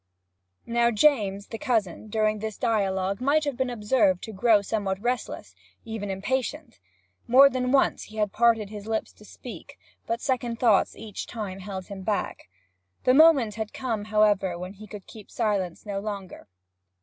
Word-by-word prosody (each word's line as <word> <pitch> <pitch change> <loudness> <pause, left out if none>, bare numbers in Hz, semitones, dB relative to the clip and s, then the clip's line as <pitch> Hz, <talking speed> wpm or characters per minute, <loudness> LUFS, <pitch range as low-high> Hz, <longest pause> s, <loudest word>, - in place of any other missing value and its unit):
Now 235 0 +2
James, 210 -5 +2
the 225 - -6
cousin, 220 - -1
during 215 0 0
this 215 -1 -5
dialogue 200 -3 0
might 290 +4 +3
have 285 -3 -2
been 260 0 -1
observed 210 -5 +1
to 220 - -6
grow 210 +1 +4
somewhat 200 -3 -2
restless, 245 +3 -3
and 225 - -14
even 205 -2 -4
impatient. 230 - -3 0.5
More 275 +3 +7
than 250 0 -1
once 275 0 +2
he 215 - -13
had 210 -2 0
parted 225 -2 +2
his 210 0 -8
lips 220 0 -2
to - - -18
speak, - - -11 0.3
but 230 0 -1
second 245 -3 -2
thoughts 225 -5 +3
each 215 -2 -7
time 205 -5 -6
held 190 -1 -6
him 200 -1 -8
back. 205 - -3 0.5
The 255 - +4
moment 280 -7 +6
had 220 0 -5
come, 225 -5 -3
however, 205 -4 +2
when 180 +2 -7
he 215 +2 -12
could 205 -2 -10
keep 215 -3 -13
silence 200 -6 -2
no 200 -1 -3
longer. 200 -2 -7
215 Hz, 170 wpm, -26 LUFS, 200-240 Hz, 0.5 s, More